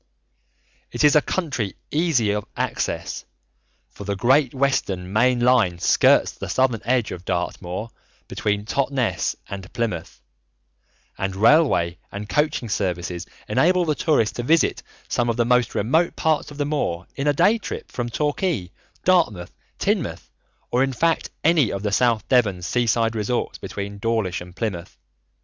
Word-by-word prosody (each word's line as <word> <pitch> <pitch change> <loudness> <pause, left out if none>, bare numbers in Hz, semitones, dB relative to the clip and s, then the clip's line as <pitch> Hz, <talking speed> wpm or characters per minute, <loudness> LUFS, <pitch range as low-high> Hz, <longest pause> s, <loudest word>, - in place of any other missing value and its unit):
It - - -1
is 150 +1 +6
a 150 - +6
country 145 - -2 0.2
easy 150 -10 +2
of 105 0 -3
access, - - -2 0.7
for - - -10
the 100 0 -2
Great 130 +6 +3
Western 100 -9 -1
main 120 +3 +3
line 120 -8 +3
skirts - - +4
the - - -8
southern 130 -4 +1
edge 125 -2 +1
of 90 - -7
Dartmoor 90 +4 -3 0.4
between 105 0 -2
Totnes 135 0 0
and 95 -1 -8
Plymouth, 115 - -3 1.0
and 95 -1 -2
railway 105 - +3
and 100 +1 -6
coaching 150 -3 0
services 90 -5 -2 0.2
enable 180 +1 +3
the 155 - +1
tourist 145 -7 +1
to - - -1
visit 160 +6 +2 0.3
some 120 -1 0
of 115 - -1
the 120 - +2
most 125 -1 +2
remote 160 +11 +1
parts 160 -1 0
of 145 - -11
the 145 - 0
moor 115 - -2
in 140 +1 -2
a 145 - +4
day 195 +10 +3
trip - - -7
from 120 -1 -3
Torquay, 145 - -1 0.3
Dartmouth, 135 - +2 0.2
Teignmouth, - - -2 0.4
or 125 - +2
in 135 0 +1
fact 165 +5 +1
any 155 -7 +4
of 100 0 -4
the 105 - -1
South 115 -1 +2
Devon 105 -9 +2
seaside 115 +2 +1
resorts 110 +3 -2
between 100 0 -6
Dawlish 110 -5 -1
and 90 0 -11
Plymouth. 95 -5 -4
120 Hz, 150 wpm, -23 LUFS, 100-145 Hz, 1.0 s, is